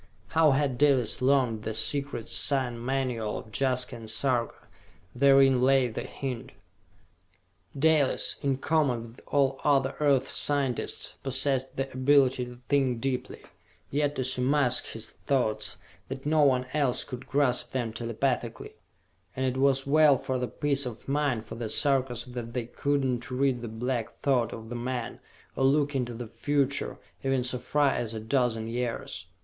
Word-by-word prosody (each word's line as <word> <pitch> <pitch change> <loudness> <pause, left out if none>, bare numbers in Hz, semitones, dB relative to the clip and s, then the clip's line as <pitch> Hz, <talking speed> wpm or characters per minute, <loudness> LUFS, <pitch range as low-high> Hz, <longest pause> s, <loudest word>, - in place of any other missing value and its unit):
How 160 +2 +4
had 135 -3 0
Dalis 135 -7 +3
learned 130 -4 +2
the 110 0 -3
secret 140 -3 0
sign 125 -4 +1
manual 125 -4 -1
of 110 - -10
Jaska 125 +1 +1
and 115 -1 -6
Sarka? 120 0 0 0.5
Therein 135 -1 +5
lay 130 -1 +4
the 110 - -5
hint. 130 -1 -6 1.2
Dalis, 150 -2 +2
in 135 -2 0
common 135 -5 +1
with 115 - -16
all 135 -2 +1
other 135 -2 +2
Earth's 140 -3 +2
scientists, 140 -4 -1
possessed 135 0 0
the 135 0 -2
ability 130 -1 +3
to 125 0 -11
think 135 -4 +1
deeply, 130 0 -3 0.5
yet 145 +1 0
to 130 - -1
so 125 0 0
mask 130 -2 +2
his 115 0 -4
thoughts 125 -6 -1 0.3
that 135 +1 -7
no 155 +1 +3
one 130 -3 +3
else 140 -5 +1
could 125 -1 -8
grasp 130 -3 +1
them 120 -4 -3
telepathically 115 +1 -2 0.6
and 130 - -1
it 130 -1 0
was 135 -1 +3
well 150 0 +5
for 130 0 -3
the 125 - -1
peace 140 -2 -1
of 115 -2 -9
mind 140 -5 0
of - - -6
the 115 -2 -3
Sarkas 135 -4 +1
that 120 -2 -7
they 125 -2 -2
could 140 +4 -1
not 125 -2 -2
read 130 -1 0
the 120 - -5
black 115 +1 -3
thought 130 -4 +2
of 110 0 -8
the 120 - -5
man, 120 0 -4 0.4
or - - 0
look 145 +1 +2
into 120 -3 -2
the 120 +1 -6
future, 140 +5 -1 0.3
even 135 -2 +1
so 125 0 -2
far 145 0 +2
as 115 -3 -3
a - - -3
dozen 115 -1 0
years. 115 -4 -4
130 Hz, 160 wpm, -28 LUFS, 120-140 Hz, 1.2 s, Therein